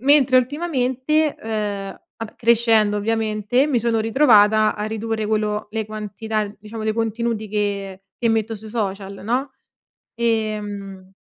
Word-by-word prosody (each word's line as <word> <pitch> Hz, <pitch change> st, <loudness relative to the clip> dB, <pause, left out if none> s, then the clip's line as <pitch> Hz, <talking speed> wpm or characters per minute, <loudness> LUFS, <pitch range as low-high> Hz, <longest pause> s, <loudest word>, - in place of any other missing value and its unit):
mentre 265 Hz, -1 st, +5 dB
ultimamente, 285 Hz, +1 st, 0 dB
ehm, 205 Hz, -3 st, -4 dB, 0.2 s
vabbè 225 Hz, -1 st, -7 dB
crescendo 225 Hz, -3 st, +3 dB
ovviamente, 220 Hz, +3 st, +1 dB
mi 270 Hz, -5 st, +2 dB
sono 230 Hz, 0 st, +1 dB
ritrovata 220 Hz, -3 st, +4 dB
a 210 Hz, -, -3 dB
ridurre 220 Hz, 0 st, -2 dB
quello 210 Hz, 0 st, -1 dB
le 220 Hz, -1 st, -3 dB
quantità 215 Hz, 0 st, -3 dB
diciamo, 215 Hz, +1 st, -7 dB
dei 220 Hz, -, +1 dB
contenuti 225 Hz, -1 st, -2 dB
che 200 Hz, -2 st, -2 dB, 0.2 s
che 230 Hz, -, +2 dB
metto 225 Hz, 0 st, 0 dB
sui 220 Hz, +1 st, -11 dB
social, 200 Hz, -3 st, -4 dB
no? 255 Hz, +5 st, -1 dB, 0.7 s
Ehm 210 Hz, -4 st, -2 dB
220 Hz, 130 wpm, -21 LUFS, 210-235 Hz, 0.7 s, mentre